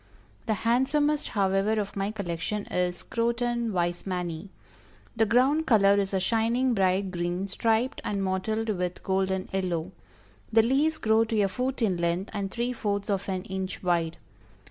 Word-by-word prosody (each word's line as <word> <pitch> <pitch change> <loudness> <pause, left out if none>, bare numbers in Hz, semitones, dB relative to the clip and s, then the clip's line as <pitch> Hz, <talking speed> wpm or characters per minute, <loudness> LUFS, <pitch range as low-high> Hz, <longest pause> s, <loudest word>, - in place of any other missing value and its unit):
The 220 - +2
handsomest 290 +5 +2
however 200 +1 +1
of 200 -1 -4
my 195 0 -1
collection, 200 0 -3
is 180 -1 -1
Croton 235 0 -1
Weismanni. 175 0 -2 0.7
The 225 -1 +2
ground 270 +8 +3
color 200 -3 +5
is 195 -1 -1
a 190 - +1
shining 230 +5 +1
bright 190 -1 +1
green, 175 +2 -2
striped 225 +6 0
and 200 -1 -1
mottled 215 +4 -1
with 180 -3 -2
golden 190 -1 0
yellow. 180 -2 -1 0.6
The 225 0 +5
leaves 290 +6 +2
grow 220 -2 +3
to 220 -1 -1
a 200 - +3
foot 255 +5 -2
in 190 -5 +2
length 170 +3 -1
and 200 -2 -2
three 240 +4 -2
fourths 205 -3 -2
of 195 0 -2
an 185 -1 -2
inch 190 0 -5
wide. 170 -2 0
200 Hz, 155 wpm, -27 LUFS, 185-230 Hz, 0.7 s, color